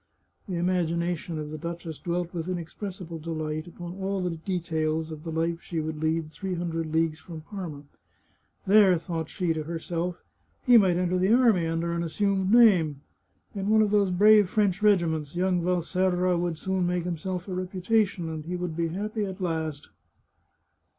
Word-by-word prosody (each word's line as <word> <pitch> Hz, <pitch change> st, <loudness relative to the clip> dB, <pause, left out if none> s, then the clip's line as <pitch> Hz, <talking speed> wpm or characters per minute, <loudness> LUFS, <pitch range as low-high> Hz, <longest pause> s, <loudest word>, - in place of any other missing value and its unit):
The 185 Hz, -, -2 dB
imagination 170 Hz, -1 st, -1 dB
of 150 Hz, -1 st, -5 dB
the 155 Hz, -, -6 dB
duchess 170 Hz, -1 st, -6 dB
dwelt 175 Hz, 0 st, -2 dB
with 170 Hz, 0 st, -4 dB
inexpressible 180 Hz, -1 st, -5 dB
delight 155 Hz, 0 st, -4 dB
upon 175 Hz, 0 st, -8 dB
all 195 Hz, 0 st, -1 dB
the 180 Hz, -, -1 dB
details 160 Hz, -2 st, -2 dB
of 155 Hz, -1 st, -7 dB
the 165 Hz, -, -5 dB
life 165 Hz, +1 st, -1 dB
she 165 Hz, -, -4 dB
would 155 Hz, 0 st, -4 dB
lead 160 Hz, 0 st, 0 dB
three 190 Hz, +2 st, -4 dB
hundred 165 Hz, -2 st, -3 dB
leagues 160 Hz, -1 st, +1 dB
from 160 Hz, -1 st, -9 dB
Parma. 165 Hz, -5 st, -7 dB, 0.4 s
" -, -, -41 dB
There," 195 Hz, -2 st, +6 dB
thought 165 Hz, -2 st, -4 dB
she 180 Hz, -4 st, -1 dB
to 160 Hz, -, -3 dB
herself, 170 Hz, +2 st, -4 dB, 0.2 s
" -, -, -41 dB
he 250 Hz, -2 st, +6 dB
might 190 Hz, -6 st, +5 dB
enter 180 Hz, 0 st, +1 dB
the 190 Hz, +3 st, +2 dB
army 225 Hz, -10 st, +4 dB
under 165 Hz, +1 st, -1 dB
an 170 Hz, -, -1 dB
assumed 190 Hz, +3 st, 0 dB
name. 180 Hz, -, +5 dB, 0.5 s
In 200 Hz, -1 st, -3 dB
one 220 Hz, 0 st, +5 dB
of 210 Hz, -, 0 dB
those 205 Hz, -2 st, +3 dB
brave 205 Hz, +2 st, +6 dB
French 200 Hz, -1 st, +1 dB
regiments, 170 Hz, -7 st, +2 dB
young 180 Hz, 0 st, +1 dB
Valserra 180 Hz, +1 st, +1 dB
would 170 Hz, -1 st, -1 dB
soon 190 Hz, +1 st, -1 dB
make 175 Hz, -1 st, 0 dB
himself 180 Hz, +2 st, -4 dB
a 190 Hz, -, -4 dB
reputation, 185 Hz, 0 st, 0 dB
and 160 Hz, -1 st, -5 dB
he 180 Hz, +2 st, -3 dB
would 175 Hz, -2 st, -3 dB
be 170 Hz, 0 st, 0 dB
happy 210 Hz, +5 st, -3 dB
at 190 Hz, 0 st, -6 dB
last." 160 Hz, -5 st, -3 dB
175 Hz, 175 wpm, -27 LUFS, 165-190 Hz, 0.5 s, There